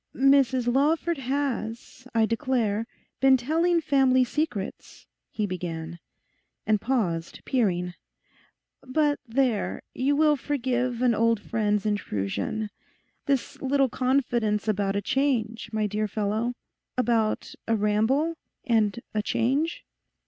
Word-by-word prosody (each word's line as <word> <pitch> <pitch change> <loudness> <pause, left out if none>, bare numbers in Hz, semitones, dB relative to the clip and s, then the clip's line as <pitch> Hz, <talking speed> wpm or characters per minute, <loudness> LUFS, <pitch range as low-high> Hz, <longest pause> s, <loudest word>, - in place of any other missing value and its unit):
'Mrs 265 -2 +4
Lawford 315 +3 +2
has, 255 -2 -3
I 225 -1 +4
declare, 230 -3 0 0.3
been 265 -1 +6
telling 330 +7 +2
family 265 -4 +4
secrets,' 250 -7 -4 0.2
he 215 - -2
began, 170 -3 -5 0.7
and 215 -2 +2
paused, 180 -11 -1
peering. 180 -8 0 0.9
'But 290 +2 +1
there, 240 -2 0
you 275 +3 +1
will 305 0 +4
forgive 250 -3 -1
an 245 -2 +4
old 230 0 +2
friend's 210 -1 0
intrusion—this 210 - -3
little 270 0 +2
confidence 240 -5 0
about 200 -2 0
a 200 - -1
change, 235 -5 0
my 215 -1 0
dear 210 +1 -1
fellow—about 220 +2 -2
a 225 - +2
ramble 220 +10 +2 0.3
and 225 -3 +2
a 215 - +1
change? 270 +10 0
235 Hz, 105 wpm, -26 LUFS, 210-270 Hz, 0.9 s, been